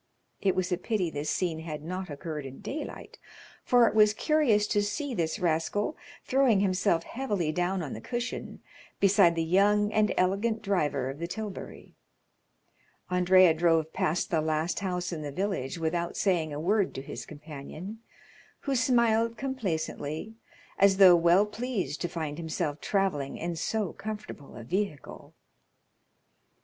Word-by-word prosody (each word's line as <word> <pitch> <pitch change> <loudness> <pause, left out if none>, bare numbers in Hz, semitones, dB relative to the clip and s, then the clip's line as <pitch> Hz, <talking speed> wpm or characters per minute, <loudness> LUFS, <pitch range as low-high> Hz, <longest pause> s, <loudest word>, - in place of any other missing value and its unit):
It 195 -2 +2
was 185 -1 -1
a 180 - 0
pity 185 -4 -1
this 145 0 -3
scene 170 -4 -1
had 155 -2 -6
not 185 +2 -5
occurred 150 +1 -5
in 135 0 -9
daylight, 305 +3 -7 0.4
for 245 -2 +5
it - - 0
was 210 -1 +5
curious 270 -10 +3
to 210 0 +1
see 255 +7 -3
this 165 -6 -1
rascal 175 - 0 0.3
throwing 260 -6 +3
himself 185 -3 +1
heavily 205 -11 -2
down 180 +2 -1
on 145 - -5
the 110 - -7
cushion 240 - -5 0.4
beside 195 -3 +5
the 165 - 0
young 205 +5 +3
and 215 -1 +3
elegant 205 +5 +1
driver 145 -10 0
of 140 - -11
the 170 - -3
tilbury. 210 +1 -7 1.2
Andrea 180 -1 +5
drove 160 -1 +2
past 160 +3 0
the 160 -2 +2
last 155 +2 -1
house 180 -2 -2
in 160 - -4
the 145 -1 -5
village 180 -5 -2
without 170 +1 -2
saying 170 -6 +1
a 145 - -4
word 195 +4 +1
to 135 - -5
his - - -7
companion, 155 +7 -9 0.6
who 275 - -1
smiled 230 -2 +2
complacently, 190 - -3 0.5
as 195 -1 +5
though 185 -3 +9
well 175 +4 +5
pleased 210 - -3
to - - 0
find 155 -2 -4
himself 160 -2 -3
travelling 185 -9 -1
in 170 +1 -3
so 205 +2 -2
comfortable 210 -9 -8
a 115 - -8
vehicle. 185 - -4
180 Hz, 150 wpm, -28 LUFS, 160-210 Hz, 1.2 s, though